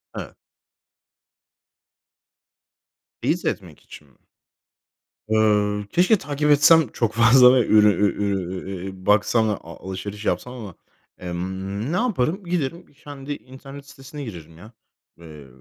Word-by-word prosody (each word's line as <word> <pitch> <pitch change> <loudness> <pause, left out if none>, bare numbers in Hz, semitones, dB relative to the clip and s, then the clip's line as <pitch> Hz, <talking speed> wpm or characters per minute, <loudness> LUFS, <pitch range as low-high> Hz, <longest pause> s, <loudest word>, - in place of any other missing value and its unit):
Evet. - - -8 2.9
Teyit - - -1
etmek - - -4
için 75 - -15
mi? 65 - -28 1.1
Ööö, 105 -1 +2
keşke 185 +4 +3
takip 150 0 -1
etsem 150 +1 +5
çok 115 -2 -1
fazla 125 +2 +6
ve 125 -3 +2
ürü 105 -1 +5
ü 100 -1 +2
ürün, 95 -2 -3 0.2
e - - -5
e 95 -1 -11
baksam 110 +2 +3
da - - +1
a 85 - -12
alışveriş 100 +3 -6
yapsam 125 - -2
ama, 105 -8 -9 0.4
emm, 95 - -5
ne - - 0
yaparım? 190 - -1
Giderim 170 0 -3
kendi 145 -1 -9
internet 135 +2 -13
sitesine 135 +1 -10
girerim 85 -6 -10
ya. 110 +6 -14 0.5
Eee, 75 -4 -13
110 Hz, 125 wpm, -22 LUFS, 95-140 Hz, 2.9 s, fazla